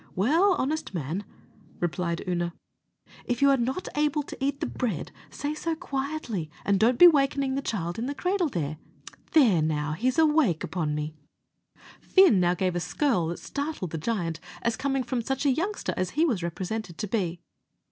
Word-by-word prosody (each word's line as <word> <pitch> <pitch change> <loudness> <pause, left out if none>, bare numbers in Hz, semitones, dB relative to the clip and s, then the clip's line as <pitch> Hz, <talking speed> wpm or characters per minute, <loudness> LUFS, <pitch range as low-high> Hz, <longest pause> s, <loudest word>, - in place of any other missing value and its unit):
"Well, 325 - +4
honest 290 -6 -2
man," 165 +5 -3 0.6
replied 175 0 -1
Oonagh, 175 -1 -1 0.7
"if 245 -1 -1
you're 280 0 +5
not 265 +9 -2
able 295 0 +1
to 270 - -8
eat 280 0 0
the 315 - -1
bread, 245 -6 -3 0.2
say 290 +1 -3
so 325 +2 -2
quietly, 270 - -3 0.2
and 200 -1 +3
don't 235 +3 +4
be 355 - +10
wakening 275 -3 +3
the 275 - -1
child 180 -7 -3
in 240 - -2
the 285 - -3
cradle 360 -1 0
there. 155 - -3 0.6
There, 230 - +5
now, 150 -1 0
he's 245 +11 0
awake 300 - +3
upon 160 -3 -2
me." 150 +1 -3 0.9
Fin 375 - +5
now 175 0 +3
gave 180 0 0
a - - +1
skirl 180 - 0
that 170 - -3
startled 285 - -4
the 160 - -3
giant, 165 -4 -2 0.2
as 235 -1 +1
coming 270 +1 -1
from 250 -1 -2
such 270 +4 -2
a 280 - +5
youngster 375 +10 -1
as 185 -1 -1
he 320 - +5
was 235 - 0
represented 180 +2 -4
to 210 - -3
be. 180 -5 -1
235 Hz, 175 wpm, -27 LUFS, 175-285 Hz, 0.9 s, be